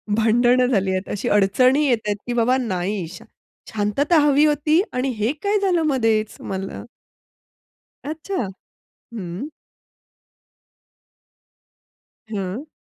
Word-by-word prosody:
भांडणं 240 +3 +3
झाली 195 -6 +1
आहेत, 190 +1 -3
अशी 205 - -2
अडचणी 250 +9 +3
येतायत, 220 -5 0
की 245 - -1
बाबा 240 +2 +2
नाही. 195 -5 -2
शा 180 - -12 0.5
शांतता 220 - +1
हवी 290 0 +4
होती 305 +2 +3
आणि 255 +1 -1
हे 215 +4 +1
काय 410 +1 +1
झालं 360 -4 +2
मधेच 225 -6 +1
मला? 190 0 -5 1.2
अच्छा. 310 - -3 0.7
हं. 190 +3 -5 2.8
हं. 205 +5 -4
235 Hz, 105 wpm, -22 LUFS, 205-285 Hz, 2.8 s, हवी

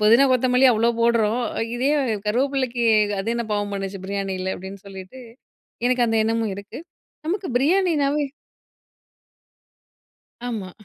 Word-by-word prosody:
புதினா, 230 +6 +6
கொத்தமல்லி 255 +1 +4
அவ்ளோ 230 +1 +2
போட்றோம். 230 0 +2 0.2
அ - - 0
இதே 260 +4 +1 0.4
கருவேப்பிலைக்கு 255 +1 0 0.4
அது 195 - -4
என்ன 235 - -2
பாவம் 205 -1 -1
பண்ணுச்சு? 195 0 -4
பிரியாணில 190 -1 -3
அப்பிடின்னு 190 +1 -10
சொல்லிட்டு 190 +6 -10 0.7
எனக்கு 250 -1 +2
அந்த 225 0 +2
எண்ணமும் 225 -1 0
இருக்கு. 200 +7 -9 0.5
நமக்கு 375 +3 -2
பிரியாணினாவே 300 -2 +2 2.2
ஆமா. 210 -6 -4
230 Hz, 115 wpm, -23 LUFS, 200-260 Hz, 2.2 s, புதினா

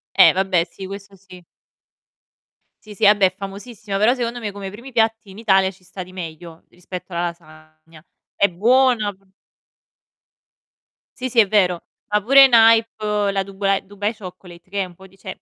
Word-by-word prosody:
Eh, - - +7
vabbè, 185 -3 0
sì, 190 - -10
questo 200 0 -10
sì. 185 -1 -16 1.4
Sì, 215 - -11
sì, 205 +1 +2
vabbè 205 -1 +5
è 185 - +1
famosissima, 200 +1 -7
però 215 +5 +3
secondo 245 -1 -4
me 210 -3 -5
come 195 -1 -7
primi 235 +7 -11
piatti 225 -3 0
in 200 - -12
Italia 190 -3 +2
ci 190 0 -23
sta 185 0 -8
di 185 - -16
meglio 165 -2 -9
rispetto 180 +1 -10
alla 170 0 -2
lasagna. 155 -1 -12 0.3
È 200 - +3
buona 235 +2 +2
p 190 - -27 2.0
Sì, 255 0 -3
sì, 240 - +2
è 215 - +5
vero. 185 -4 +1 0.3
Ma 210 0 +2
pure 275 +6 +7
in 270 - +5
hype 220 -3 +3
la 195 - -1
Duba 195 0 -1
Dubai 205 +2 -4
Chocolate, 180 -2 -13
che 200 0 -2
è - - -4
un 180 - -14
po' 190 +2 -16
di 195 +1 -24
cioè - - -8
195 Hz, 180 wpm, -20 LUFS, 180-215 Hz, 2.0 s, Eh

